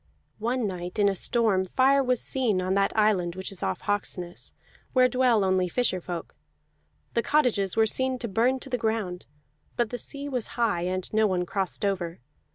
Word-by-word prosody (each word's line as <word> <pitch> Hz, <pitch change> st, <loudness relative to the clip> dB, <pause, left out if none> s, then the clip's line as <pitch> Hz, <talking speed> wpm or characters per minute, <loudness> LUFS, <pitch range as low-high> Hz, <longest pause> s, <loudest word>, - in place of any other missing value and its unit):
One 240 Hz, +2 st, -1 dB
night 180 Hz, -1 st, -5 dB
in 205 Hz, -1 st, +4 dB
a 195 Hz, -, +1 dB
storm, 215 Hz, -2 st, +2 dB
fire 265 Hz, +8 st, +3 dB
was 250 Hz, -2 st, +1 dB
seen 240 Hz, -8 st, +1 dB
on 185 Hz, +1 st, 0 dB
that 195 Hz, 0 st, +2 dB
island 190 Hz, -5 st, +2 dB
which 190 Hz, +1 st, -5 dB
is 195 Hz, -, -9 dB
off 95 Hz, -, -2 dB
Hawksness, 180 Hz, -3 st, -3 dB, 0.4 s
where 255 Hz, -1 st, +5 dB
dwell 250 Hz, -4 st, +3 dB
only 185 Hz, -1 st, +1 dB
fisher 190 Hz, -4 st, 0 dB
folk; 170 Hz, -, -6 dB, 0.8 s
the 235 Hz, -, +2 dB
cottages 230 Hz, -10 st, +1 dB
were 220 Hz, -, +5 dB
seen 260 Hz, +3 st, 0 dB
to 245 Hz, -, -4 dB
burn 235 Hz, +6 st, +1 dB
to 270 Hz, -, -5 dB
the 250 Hz, -, 0 dB
ground, 220 Hz, -6 st, -2 dB, 0.5 s
but 240 Hz, -2 st, 0 dB
the 245 Hz, -, -4 dB
sea 280 Hz, +5 st, -4 dB
was 250 Hz, -5 st, -2 dB
high, 220 Hz, -7 st, +1 dB
and 185 Hz, +2 st, -3 dB
no 220 Hz, 0 st, +4 dB
one 180 Hz, -2 st, 0 dB
crossed 195 Hz, +2 st, -2 dB
over. 180 Hz, -4 st, -2 dB
210 Hz, 185 wpm, -26 LUFS, 185-245 Hz, 0.8 s, where